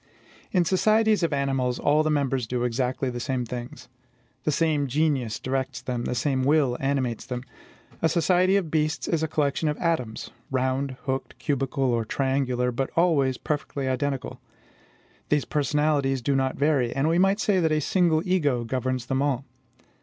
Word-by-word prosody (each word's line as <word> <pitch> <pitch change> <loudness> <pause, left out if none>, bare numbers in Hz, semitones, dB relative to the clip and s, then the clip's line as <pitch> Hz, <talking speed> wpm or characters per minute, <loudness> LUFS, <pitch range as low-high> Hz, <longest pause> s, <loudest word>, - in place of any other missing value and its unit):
In 180 -3 +2
societies 215 +4 +3
of 170 - +1
animals, 135 -3 0
all 150 +1 +3
the 155 - 0
members 135 -5 0
do 120 +1 -1
exactly 125 +2 -1
the 120 - -5
same 125 0 -2
things. 120 +1 -7 0.6
The 155 - +2
same 150 -2 +1
genius 135 -5 0
directs 130 -1 -2
them; 125 -1 -4
the - - -2
same 135 0 0
will 140 -3 +3
animates 135 -4 -1
them. 125 -1 -4 0.6
A 165 - +3
society 180 +3 +3
of 180 -6 0
beasts 155 +1 0
is 165 -2 0
a 160 - 0
collection 150 0 0
of 150 - -2
atoms, 130 -10 -2 0.2
round, 130 0 -1
hooked, 135 0 -3
cubical, 135 -1 -1
or 120 -3 +1
triangular, 130 0 0
but 130 +2 -2
always 145 -7 +2
perfectly 145 -2 -3
identical. 135 +1 -2 0.9
These 150 -1 +2
personalities 145 -3 +1
do 140 +3 +1
not 130 0 0
vary, 140 -5 +2
and 135 +2 +1
we 165 +2 +2
might 195 +2 +3
say 205 -3 +2
that 160 -2 +2
a 155 - +2
single 165 0 +2
ego 145 -10 +1
governs 130 +1 -2
them 135 0 -1
all. 140 -2 0
140 Hz, 170 wpm, -25 LUFS, 130-155 Hz, 0.9 s, societies